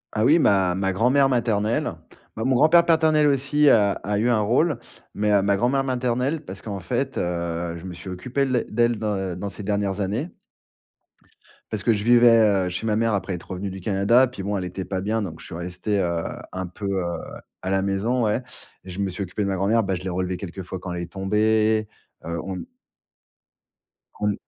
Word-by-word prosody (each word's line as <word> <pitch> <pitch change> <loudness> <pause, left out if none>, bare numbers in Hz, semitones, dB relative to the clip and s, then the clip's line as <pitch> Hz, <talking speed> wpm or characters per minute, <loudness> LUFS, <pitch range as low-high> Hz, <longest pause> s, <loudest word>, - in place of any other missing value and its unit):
Ah 110 - +2
oui, 150 +6 +6
ma 95 - +3
ma 95 0 0
grand-mère 130 +7 +3
maternelle. 115 -4 0 0.5
Ben, 110 - -2
mon 130 0 +3
grand-père 170 +6 +6
paternel 160 -2 +4
aussi 145 +2 +2
a 100 -5 +5
a 105 +1 -3
eu 115 +3 +2
un 115 -3 +3
rôle 130 +10 +2 0.4
mais 105 -1 +3
ma 100 0 +2
grand-mère 130 +5 +1
maternelle, 130 +3 -1
parce 95 +1 -8
qu'en 100 -3 -5
fait, 130 +7 -2
heu, 85 -1 -2
je 85 - -11
me 90 - -6
suis 90 +3 -9
occupé 125 +10 -1
les 130 -3 +1
d'elle 120 +1 +1
dans 95 -4 -2
dans 100 - -3
ses 105 - -8
dernières 100 0 -1
années. 110 - -2 1.4
Parce 105 -2 -3
que 115 - +4
je 105 - -2
vivais, 120 0 +6 0.3
heu, - - -2
chez 90 +5 -4
ma 110 -1 +1
mère 115 0 +1
après 95 -1 -2
être 90 - -8
revenu 95 +2 -4
du 95 0 -8
Canada. 105 +7 +3
Puis 110 -6 -8
bon, 100 +1 -1
elle 95 - -3
était 90 +1 -5
pas 95 +1 -3
bien, 110 +3 -1
donc 80 -6 -6
je - - -12
suis - - -8
resté, 90 +4 -2
heu, 85 -3 0 0.3
un 95 -1 -4
peu, 90 +3 -8 0.2
heu, 85 -1 -2 0.5
à 95 - -4
la 95 0 +2
maison, 100 +6 0
ouais 110 +4 0 0.4
et 95 - -12
je 90 +2 -7
me 100 -1 0
suis 95 +2 -4
occupé 95 +3 -3
de - - -1
ma 100 - 0
grand-mère. 105 +5 +2
Bah, 95 -2 -1
je 90 - -7
l'ai 95 - -3
relevée 90 0 -2
quelquefois 95 0 -7
quand 90 0 -6
elle 85 - -4
est 85 0 -7
tombée, 110 +3 +1 0.4
heu, 85 0 -3
on 90 -2 -5 1.6
on 105 0 +1
105 Hz, 210 wpm, -23 LUFS, 95-120 Hz, 1.6 s, oui